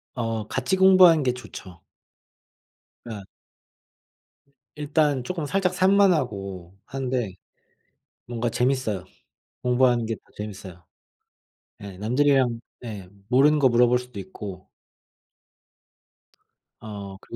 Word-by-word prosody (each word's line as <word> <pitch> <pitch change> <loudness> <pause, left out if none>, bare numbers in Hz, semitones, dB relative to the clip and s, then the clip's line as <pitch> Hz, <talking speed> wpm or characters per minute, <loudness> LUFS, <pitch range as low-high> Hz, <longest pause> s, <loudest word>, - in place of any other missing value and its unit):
어. 115 -3 -3
같이 130 +10 -1
공부하는 185 -4 +7
게 125 -2 +1
좋죠. 95 -8 -11 1.2
어. 110 -4 -7 1.5
일단 150 -2 +1
쪼끔 165 +2 -4
살짝 185 +3 0
산만하고 130 - +1
하는데 125 -7 -3 0.9
뭔가 120 0 -2
재밌어요. 125 -6 -1 0.6
공부하는 125 -1 +3
게 115 - -2
더 - - -23 0.2
재밌어요. 95 -4 -8 1.0
예 100 -2 -9
남들이랑 125 +2 +2 0.2
네 105 -6 -7 0.2
모르는 145 +4 +4
거 135 -2 +5
물어볼 120 +1 +4
수도 125 -4 -9
있고. 95 0 -9 2.1
어. 100 -3 -8
그 110 - -11
125 Hz, 205 characters per minute, -24 LUFS, 105-140 Hz, 2.1 s, 공부하는